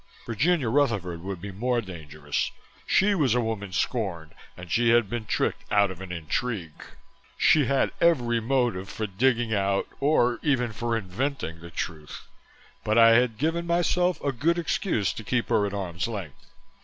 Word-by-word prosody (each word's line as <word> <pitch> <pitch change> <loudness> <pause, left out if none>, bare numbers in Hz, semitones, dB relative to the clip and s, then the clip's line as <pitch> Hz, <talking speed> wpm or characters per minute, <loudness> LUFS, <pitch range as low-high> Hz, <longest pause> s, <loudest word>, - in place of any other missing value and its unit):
Virginia 135 - +1
Rutherford 105 -10 0
would 95 0 -5
be 100 +3 -7
more 120 +5 0
dangerous 75 -7 -4 0.4
she 205 +2 +3
was 140 - +2
a - - +3
woman 110 -4 -3
scorned 90 -7 -2 0.2
and 90 -2 -10
she 120 0 +3
had 115 -3 +3
been 120 -2 -3
tricked - - -1
out 100 -2 +3
of 95 0 -10
an 95 -2 -7
intrigue. 85 +1 -3 0.6
She 150 -3 +4
had 135 +1 +1
every 125 -9 +3
motive 115 -6 0
for 110 - -3
digging 115 +3 +1
out 100 -1 0
or 125 -4 +2
even 125 -6 0
for 115 +2 -1
inventing 105 - -3
the 85 0 -10
truth, 80 -2 -6 0.6
but 110 +1 +1
I 115 0 +8
had 115 -1 +3
given 165 +5 -1
myself 175 +1 +1
a 140 - +1
good 155 +7 +1
excuse 165 - 0
to 110 - -8
keep 120 +2 -1
her 110 -3 +2
at 100 - -6
arm's 90 -2 -3
length. 100 - -7
115 Hz, 170 wpm, -26 LUFS, 95-130 Hz, 0.6 s, I